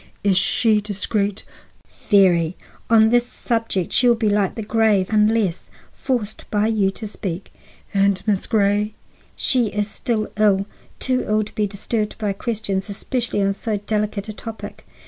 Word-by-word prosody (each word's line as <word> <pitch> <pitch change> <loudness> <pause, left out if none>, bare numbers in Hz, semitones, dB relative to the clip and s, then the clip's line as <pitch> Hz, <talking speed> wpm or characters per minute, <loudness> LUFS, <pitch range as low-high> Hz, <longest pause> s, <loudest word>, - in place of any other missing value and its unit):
"Is 200 -2 +3
she 210 +3 +3
discreet?" 205 0 -2 0.7
"Very. 180 -4 +4 0.3
On 220 -1 +6
this 240 0 +3
subject 225 -8 -2
she 250 - +4
will 240 - +5
be 220 -2 +1
like 205 -2 +1
the 225 - -4
grave 215 -3 +2
unless 210 -4 +2 0.2
forced 230 -6 -3
by 210 0 +1
you 215 -3 +2
to 205 +3 -6
speak." 190 -3 -5 0.4
"And 195 -1 +3
Miss 205 -3 0
Grey?" 210 0 +1 0.4
"She 250 -4 +1
is 205 0 -1
still 215 0 -2
ill, 200 -2 +3 0.3
too 255 -1 0
ill 215 0 +2
to 210 - -10
be 210 -2 0
disturbed 210 +2 -3
by 210 -2 -1
questions, 200 -2 -2
especially 230 +1 -1
on 195 0 +2
so 215 +1 -2
delicate 210 0 -2
a 215 - -5
topic. 225 +1 -9
210 Hz, 155 wpm, -21 LUFS, 200-225 Hz, 0.7 s, On